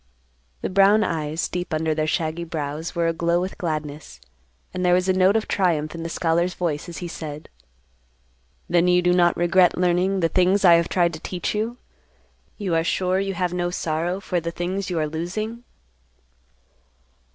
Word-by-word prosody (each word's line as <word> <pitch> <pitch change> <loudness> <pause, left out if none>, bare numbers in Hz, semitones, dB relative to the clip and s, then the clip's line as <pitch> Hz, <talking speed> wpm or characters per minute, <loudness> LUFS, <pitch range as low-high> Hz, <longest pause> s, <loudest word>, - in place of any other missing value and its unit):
The - - -1
brown 200 +3 +5
eyes, 160 -2 -2
deep 180 0 -4
under 155 0 0
their 155 0 -1
shaggy 160 +1 -1
brows, 155 0 -5
were 170 -1 +1
aglow 170 +1 +1
with 185 +3 -4
gladness, 150 - -5 0.5
and 185 - -3
there 180 0 +4
was 180 +1 +1
a 185 - +3
note 185 +2 +4
of 220 - 0
triumph 165 -6 0
in 165 - -6
the 165 - -4
scholar's 170 +2 0
voice 165 -2 -2
as 170 - -8
he - - -3
said, 155 -2 -7 1.2
"Then 175 0 +3
you 180 0 +4
do 180 0 +3
not 175 -1 +3
regret 175 +1 +3
learning 180 +2 +1
the 165 - +3
things 190 +3 +3
I 175 - +8
have 170 0 +3
tried 170 -2 +2
to 160 - -7
teach 180 +2 -3
you? 225 +3 -2 0.8
You 195 -5 -2
are 165 0 +2
sure 185 +2 0
you 195 -1 -2
have 180 -1 -1
no 175 0 -1
sorrow 170 +1 -2
for 185 -2 -2
the 170 0 -4
things 185 +3 -3
you 175 - -2
are 155 - +1
losing." 215 +9 -4
175 Hz, 185 wpm, -23 LUFS, 165-185 Hz, 1.2 s, I